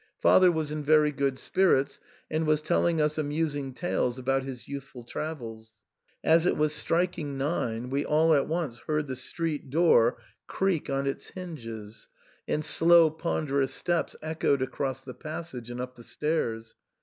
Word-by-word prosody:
Father 185 -1 +6
was 160 -3 -2
in 150 0 -3
very 150 0 +4
good 140 -2 -1
spirits, 145 -5 +2 0.3
and 155 0 0
was 155 0 +2
telling 170 0 +2
us 150 0 +1
amusing 145 -2 -1
tales 130 -4 -1
about 135 +1 0
his 130 -3 -8
youthful 140 -3 -8
travels. 115 -7 -7 0.4
As 165 +2 +4
it - - +1
was 150 0 +2
striking 165 -2 -1
nine 125 -4 -2
we 140 +1 0
all 160 +2 +3
at 140 -2 +2
once 155 -7 -2
heard 150 -1 0
the 130 - -4
street 150 +3 -4
doof 135 -6 +4 0.3
.creak 190 -5 0
on 135 0 0
its 135 - -3
hinges, 115 - -8 0.4
and 150 0 -1
slow 165 -1 +6
ponderous 140 -4 -1
steps 175 -1 -1
echoed 155 -4 +1
across 135 0 -3
the 130 -1 -9
passage 155 -7 -7
and 120 0 -6
up 125 0 -5
the 120 - -14
stairs. 115 -7 -2
150 Hz, 160 wpm, -28 LUFS, 130-160 Hz, 0.4 s, Father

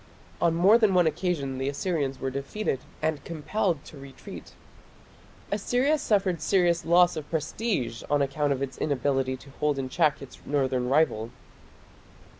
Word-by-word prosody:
On 170 -1 +3
more 195 +7 +6
than 210 -5 +3
one 180 -1 +5
occasion 150 -5 -1
the 135 +1 -1
Assyrians 140 -3 -2
were 135 - -2
defeated 140 +3 -2 0.2
and 155 -3 -1
compelled 170 0 -2
to 145 - -12
retreat. 135 -1 -11 1.0
Assyria 250 +9 +1
suffered 195 - +1
serious 175 -1 +2
loss 175 +1 +5
of 155 -2 -6
prestige 155 - -2
on 145 - +3
account 140 +1 0
of 135 0 0
its 135 - -6
inability 135 -2 0
to 135 +2 -15
hold 150 -2 +1
in 130 -1 -3
check 150 0 +2
its 135 - -11
northern 130 -3 0
rival. 130 -6 +2
150 Hz, 150 wpm, -27 LUFS, 135-180 Hz, 1.0 s, more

